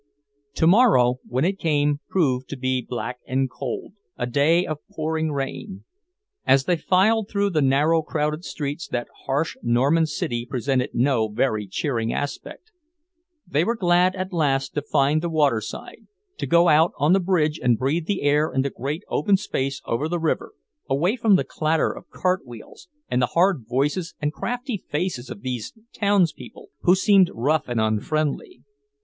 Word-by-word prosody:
Tomorrow, 160 - +4
when 130 +5 0
it 195 +1 -1
came, 145 -2 +1
proved 130 -8 0
to 140 - -5
be 130 0 0
black 125 +1 -5
and 130 +1 0
cold, 130 +6 -6 0.2
a 120 - -1
day 145 +8 +2
of 155 -1 -4
pouring 160 0 -2
rain. 145 +8 -5 0.6
As 135 0 +4
they 180 - +2
filed 200 +5 +2
through 200 -1 0
the 155 -3 +1
narrow, 145 +5 +3
crowded 150 +1 -2
streets, 145 -2 -5
that 120 -1 -3 0.2
harsh 145 +4 0
Norman 135 +8 +2
city 120 -5 -3
presented 130 +1 -1
no 120 -3 +2
very 110 -1 -1
cheering 115 +2 -2
aspect. 145 - -5 0.7
They 155 -3 +1
were 235 +6 0
glad, 180 -2 +3
at 185 0 -5
last, 140 -5 0
to 145 - -1
find 145 +3 +1
the 170 - -2
waterside, 140 -9 -1 0.3
to - - -2
go 170 +1 +4
out 160 +2 +4
on 150 +4 +3
the 195 - +4
bridge 170 -4 +1
and 120 -2 +3
breathe 150 +7 -1
the 200 -6 -1
air 150 +2 +2
in 130 - +1
the 140 - -2
great 145 - -4
open 200 -2 +2
space 135 -8 -3
over 135 +7 -1
the 175 - -1
river, 165 -1 -2 0.4
away 165 - +1
from 225 -5 +4
the - - +2
clatter 155 0 0
of - - -12
cart 185 0 -1
wheels 120 - -13 0.2
and 125 - 0
the 125 - +2
hard 175 - +3
voices 145 +7 -1
and 150 0 -1
crafty 245 - -3
faces 150 -7 -4
of 100 - -9
these 125 -4 -4 0.2
townspeople, 200 - 0
who 180 0 +5
seemed 195 -1 +4
rough 145 +6 0
and 120 -2 -1
unfriendly. 145 - -1
150 Hz, 165 wpm, -23 LUFS, 130-175 Hz, 0.7 s, who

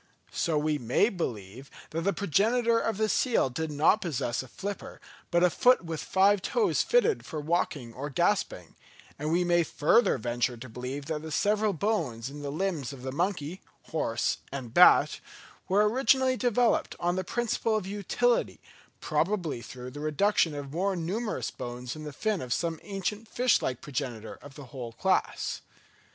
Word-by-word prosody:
So 160 -3 0
we 150 0 0
may 125 - +2
believe 125 - -5 0.2
that 165 - -2
the 195 +4 +1
progenitor 230 +6 +2
of 225 -3 -1
the 220 0 +2
seal 225 - +2
did 160 +4 -3
not 155 +9 +3
possess 135 -8 -2
a 130 - -10
flipper, 200 +9 -6 0.3
but 175 0 +3
a 180 - +6
foot 250 -3 +4
with 165 -2 -4
five 195 +1 +3
toes 450 - +1
fitted 465 -2 +2
for 155 - -5
walking 145 -6 -1
or 140 +4 -5
grasping; 170 - 0 0.4
and 150 +2 -2
we 175 +2 +3
may 175 -1 +3
further 165 - +3
venture 120 +1 -1
to 125 +3 -9
believe 125 +4 -6
that 150 0 -3
the 160 - -7
several 210 +6 +1
bones 155 - -1
in 145 +1 -8
the 145 - -4
limbs 160 -4 -2
of 135 -3 -10
the 130 - -3
monkey, 175 +1 -2 0.3
horse 120 -7 0
and 130 -4 -6
bat, - - +6 0.5
were 205 +3 +4
originally 260 +2 +3
developed, 245 -1 +1
on 175 +1 0
the 185 - -1
principle 230 +2 -1
of 215 -4 -1
utility, 210 - 0 0.4
probably 165 - -1
through 125 +1 -9
the 145 - -8
reduction 155 +2 +2
of 140 -1 -6
more 190 +3 0
numerous 200 +7 -2
bones 125 +1 -6
in 155 0 -8
the 150 - -5
fin 210 +6 -1
of 125 - -7
some 165 +4 -1
ancient 205 +2 -4
fish 250 +1 +2
like 125 -2 -2
progenitor 120 -5 -4
of 140 -2 -12
the 145 - -9
whole 120 -4 -6
class. - - 0
165 Hz, 170 wpm, -28 LUFS, 135-205 Hz, 0.5 s, a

